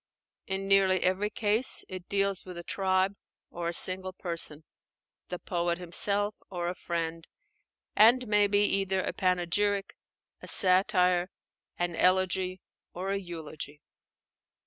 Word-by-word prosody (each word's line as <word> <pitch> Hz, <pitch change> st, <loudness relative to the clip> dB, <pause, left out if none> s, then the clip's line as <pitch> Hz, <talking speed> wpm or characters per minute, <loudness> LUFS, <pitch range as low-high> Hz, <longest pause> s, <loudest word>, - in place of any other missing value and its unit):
In 195 Hz, 0 st, -3 dB
nearly 195 Hz, -1 st, +4 dB
every 190 Hz, +3 st, +1 dB
case 215 Hz, +4 st, +1 dB
it 185 Hz, -1 st, -9 dB
deals 195 Hz, -1 st, 0 dB
with 180 Hz, -2 st, -10 dB
a 170 Hz, -, -7 dB
tribe 190 Hz, +1 st, 0 dB, 0.4 s
or 170 Hz, 0 st, -4 dB
a -, -, -4 dB
single 185 Hz, +1 st, +3 dB
person, 165 Hz, -4 st, -3 dB, 0.7 s
the 180 Hz, -, -4 dB
poet 175 Hz, -1 st, -2 dB
himself 200 Hz, +4 st, 0 dB, 0.2 s
or 175 Hz, -2 st, -3 dB
a -, -, -3 dB
friend, 165 Hz, -2 st, -4 dB, 0.7 s
and 240 Hz, +3 st, +5 dB
may 210 Hz, -1 st, +3 dB
be 205 Hz, 0 st, +2 dB
either 195 Hz, -2 st, 0 dB
a -, -, -3 dB
panegyric, 195 Hz, +2 st, 0 dB, 0.5 s
a -, -, -10 dB
satire, 185 Hz, -1 st, +3 dB, 0.5 s
an 175 Hz, -1 st, -2 dB
elegy, 185 Hz, 0 st, +1 dB, 0.3 s
or 190 Hz, +2 st, -3 dB
a 200 Hz, -, 0 dB
eulogy. 155 Hz, -4 st, -9 dB
185 Hz, 130 wpm, -29 LUFS, 175-195 Hz, 0.7 s, and